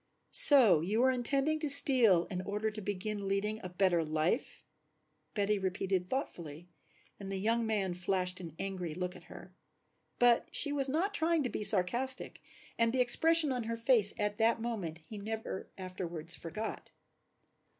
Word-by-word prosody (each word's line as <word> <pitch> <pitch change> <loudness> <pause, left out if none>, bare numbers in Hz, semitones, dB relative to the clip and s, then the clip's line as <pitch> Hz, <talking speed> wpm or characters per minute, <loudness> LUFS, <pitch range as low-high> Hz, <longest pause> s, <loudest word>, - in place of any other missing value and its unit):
"So 270 - +8
you 205 +7 -2
were 260 +1 +3
intending 275 +5 +1
to 305 -2 +1
steal 250 -10 +5
in 180 -1 -4
order 210 +3 -4
to 215 0 -8
begin 205 +1 -5
leading 205 +2 -3
a 185 - -7
better 180 -2 0
life," 155 +2 -3 0.7
Betty 205 0 -1
repeated 190 -1 -3
thoughtfully, 170 - -7 0.5
and 195 -1 -8
the 195 - -3
young 225 +3 -1
man 200 -4 -2
flashed 180 0 -2
an 165 -3 -10
angry 185 -5 -6
look 180 +1 -5
at - - -15
her. - - -14 0.6
But 245 -1 +2
she 290 - +3
was 280 -2 +2
not 350 +9 -2
trying 330 -4 0
to 250 - -4
be - - -5
sarcastic 225 +7 0 0.4
and 230 0 +2
the 260 - -2
expression 315 +5 +5
on 250 -3 -4
her 230 0 -5
face 230 -3 +2
at 210 +1 -3
that 225 +1 +1
moment 200 -9 -6
he 215 - -9
never 220 -1 -7
afterwards 175 -3 -7
forgot. 215 +7 -7
210 Hz, 160 wpm, -31 LUFS, 185-245 Hz, 0.7 s, So